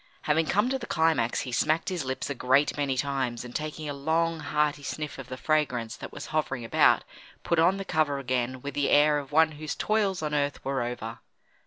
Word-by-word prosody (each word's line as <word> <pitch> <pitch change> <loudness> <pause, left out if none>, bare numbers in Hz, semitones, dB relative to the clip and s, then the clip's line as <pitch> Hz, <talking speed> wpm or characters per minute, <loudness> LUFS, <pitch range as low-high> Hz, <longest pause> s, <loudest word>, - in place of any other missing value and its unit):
Having 155 +1 +2
come 205 +5 +2
to 265 0 -1
the - - -7
climax, 160 -8 +2
he 125 - -5
smacked 155 +6 +1
his 180 -5 -2
lips 130 0 -3
a 140 - -2
great 135 +3 +2
many 140 -3 -1
times, 130 -3 -1
and 120 - -10
taking 155 0 -4
a 145 - -3
long, 160 +3 0
hearty 150 -1 0
sniff 150 0 -5
of 130 - -8
the 130 - -6
fragrance 130 -7 0
that - - -9
was - - -7
hovering 135 -6 -1
about, - - +4 0.4
put 170 - +1
on 180 +4 +4
the 195 - -5
cover 155 -5 +1
again 130 -1 -2
with 140 - -4
the 145 -1 0
air 150 0 +5
of 140 -1 -9
one 160 +1 +5
whose 155 0 -5
toils 205 -5 0
on 150 -1 -2
earth 145 -1 -1
were 135 -1 0
over. 120 -1 -5
145 Hz, 215 wpm, -27 LUFS, 130-155 Hz, 0.4 s, air